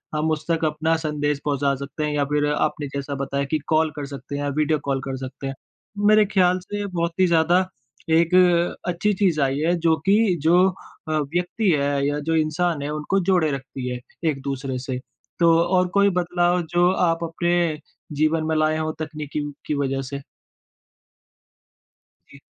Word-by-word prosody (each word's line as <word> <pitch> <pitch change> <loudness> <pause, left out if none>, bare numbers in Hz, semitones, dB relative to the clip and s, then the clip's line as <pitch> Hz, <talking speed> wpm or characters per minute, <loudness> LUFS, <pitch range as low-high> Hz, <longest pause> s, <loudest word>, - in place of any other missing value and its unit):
हम 155 +1 0
उस 155 -1 -2
तक 165 -1 +1
अपना 155 +2 +1
संदेश 150 -2 -1
पहुँचा 140 -1 +1
सकते 145 +2 -5
हैं 150 - -2
या 145 -1 +1
फिर 150 0 +2
आपने 150 -1 -1
जैसा 140 0 -3
बताया 140 0 -2
कि 155 - +1
कॉल 155 0 +2
कर 145 - -4
सकते 140 +1 -7
हैं 145 - -3
या 145 - -1
वीडियो 155 0 +2
कॉल 135 -1 0
कर 130 - -3
सकते 130 +1 -7
हैं। 135 - -3 0.5
मेरे 215 0 +6
ख्याल 185 -2 +2
से 205 +2 -5
बहुत 170 -3 -2
ही 185 - +5
ज़्यादा 170 +2 +3 0.5
एक 170 0 +3 0.6
अच्छी 180 +4 +1
चीज़ 185 -5 +1
आई 135 0 +1
है, 165 +3 +2
जो 165 -1 +2
कि 200 -1 +4
जो 175 +4 +5 0.4
अ, - - -1
व्यक्ति 175 +8 0
है 140 -1 +1
या 145 0 -1
जो 160 +2 -1
इंसान 160 0 0
है, 145 - -3
उनको 150 +6 -1
जोड़े 175 -5 +3
रखती 135 -1 -5
है, 125 0 -4 0.3
एक-दूसरे 135 -2 -3
से। 130 0 -4 0.4
तो 170 -1 +5
और 180 0 +2
कोई 200 0 +5
बदलाव, 175 0 +1
जो 175 +2 +2
आप 170 -3 +1
अपने 170 -1 0 0.4
जीवन 155 +1 +2
में 160 - 0
लाएँ 155 0 +2
हों, 155 0 -1
तकनीकी 150 -1 -4 0.2
की - - -1
वज़ह 135 0 -1
से? 140 +1 -6 2.1
जी। 140 - -15
155 Hz, 180 wpm, -23 LUFS, 145-175 Hz, 2.1 s, मेरे